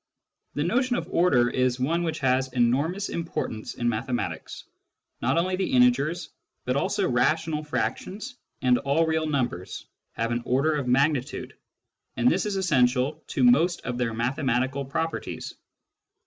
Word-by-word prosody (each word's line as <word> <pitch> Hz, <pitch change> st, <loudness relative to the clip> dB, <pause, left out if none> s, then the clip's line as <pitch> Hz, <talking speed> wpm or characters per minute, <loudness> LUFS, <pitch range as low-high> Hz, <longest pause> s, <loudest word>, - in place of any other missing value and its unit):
The 145 Hz, -, 0 dB
notion 245 Hz, -, +1 dB
of -, -, -3 dB
order 140 Hz, -9 st, +4 dB
is 130 Hz, 0 st, +1 dB
one 160 Hz, +7 st, +1 dB
which 160 Hz, -2 st, -2 dB
has 130 Hz, 0 st, +1 dB
enormous 140 Hz, +11 st, +1 dB
importance 165 Hz, -9 st, -4 dB
in 120 Hz, -, -2 dB
mathematics. 120 Hz, +2 st, -3 dB, 0.6 s
Not -, -, +1 dB
only 185 Hz, +2 st, +1 dB
the 190 Hz, -, -1 dB
integers, 140 Hz, +7 st, +3 dB, 0.4 s
but 125 Hz, -, 0 dB
also 140 Hz, -, 0 dB
rational 155 Hz, +5 st, +1 dB
frac 150 Hz, -, -1 dB
tions 215 Hz, +7 st, -8 dB, 0.3 s
and 125 Hz, -1 st, +4 dB
all 140 Hz, +4 st, +2 dB
real 160 Hz, 0 st, 0 dB
numbers 120 Hz, -, -2 dB, 0.3 s
have 115 Hz, +1 st, -2 dB
an 120 Hz, 0 st, -1 dB
order 135 Hz, +6 st, +2 dB
of 145 Hz, -4 st, -2 dB
magnitude, 135 Hz, +2 st, 0 dB, 0.6 s
and -, -, +2 dB
this 250 Hz, -, +2 dB
is 205 Hz, -, -2 dB
essential 140 Hz, -4 st, +1 dB
to 135 Hz, -, -1 dB
most 160 Hz, +9 st, +4 dB
of 125 Hz, 0 st, -4 dB
their 115 Hz, -2 st, -1 dB
mathematical 130 Hz, +2 st, 0 dB
properties. 160 Hz, +4 st, -4 dB
140 Hz, 150 wpm, -26 LUFS, 125-160 Hz, 0.6 s, order